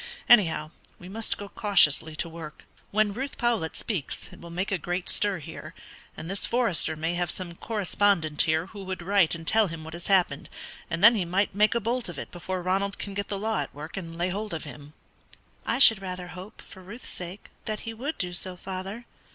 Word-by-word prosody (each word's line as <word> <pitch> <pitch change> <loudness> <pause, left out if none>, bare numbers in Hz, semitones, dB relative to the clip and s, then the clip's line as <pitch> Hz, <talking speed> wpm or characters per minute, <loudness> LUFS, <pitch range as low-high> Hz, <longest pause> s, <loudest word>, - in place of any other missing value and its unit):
Anyhow, 165 -9 +5 0.3
we 180 - -11
must 220 +3 -2
go 205 - -7
cautiously 160 -7 +4
to 170 - -1
work. 160 -2 -9 0.3
When 210 0 +2
Ruth 265 +5 -4
Powlett 230 -10 0
speaks, 185 - -4
it - - -14
will 170 - -9
make 180 +4 -2
a 190 - +1
great 175 +3 -3
stir 205 -2 +2
here, 155 - -9 0.4
and 160 - -6
this 195 +2 0
Forester 230 -10 +2
may 165 +2 -1
have 175 -1 -1
some 175 -1 -3
correspondent 195 -5 +2
here 160 +1 +2
who 200 +1 -10
would 185 -2 -5
write 190 -3 +3
and 165 -1 -8
tell 220 +3 +4
him 165 -2 -7
what 160 0 -8
has 170 0 -6
happened, 180 -7 +2 0.4
and 165 +3 -2
then 230 +3 +10
he 210 -5 +1
might 185 +4 +1
make 210 +3 +3
a - - +3
bolt 235 0 -1
of 175 - -7
it - - -6
before 180 +1 -4
Ronald 195 +2 0
can 200 - -5
get 200 +1 -3
the 200 - -3
law 220 +2 -1
at - - -4
work 150 +2 -7
and 165 -3 -6
lay 175 +2 0
hold 205 0 -3
of 160 - -5
him." 145 0 -10 0.7
"I 235 - +1
should 225 -6 +7
rather 180 -1 -5
hope, 185 +5 -10
for 190 - -13
Ruth's 205 +7 -10
sake, 180 +3 -7
that 215 -1 -3
he 225 - -5
would 275 +8 -4
do 180 -1 -2
so, 180 +1 -2
father. 190 +5 -6
185 Hz, 215 wpm, -27 LUFS, 170-210 Hz, 0.7 s, then